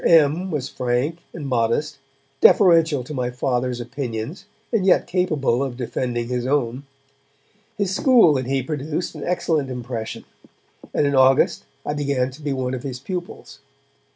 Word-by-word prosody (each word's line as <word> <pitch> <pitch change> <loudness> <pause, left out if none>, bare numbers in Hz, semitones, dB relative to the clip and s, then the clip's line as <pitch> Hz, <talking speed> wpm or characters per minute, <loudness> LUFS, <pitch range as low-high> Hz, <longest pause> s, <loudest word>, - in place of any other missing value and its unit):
M. 165 +3 +4
was 145 -6 -2
frank 130 +7 -1
and 150 -5 -6
modest, 130 +4 0 0.4
deferential 165 - +5
to 140 - -8
my 125 -3 -1
Father's 125 0 -1
opinions 125 - -5 0.3
and 220 -4 +2
yet 190 - +4
capable 155 -9 0
of 130 -3 -4
defending 120 -1 -2
his 125 0 -2
own. 135 -1 -1 0.9
His 200 -2 0
school 225 - +5
and 130 -2 -2
he 135 -1 0
produced 150 +4 -3
an - - -8
excellent 160 -5 0
impression, 120 -3 -5 0.7
and - - +1
in 140 - +1
August 130 0 +4 0.2
I 145 - -1
began 140 -3 0
to 140 +4 -13
be 145 -1 -2
one 130 -1 -2
of 130 - -3
his 130 -2 -5
pupils. 175 -3 -7
135 Hz, 155 wpm, -22 LUFS, 125-155 Hz, 0.9 s, deferential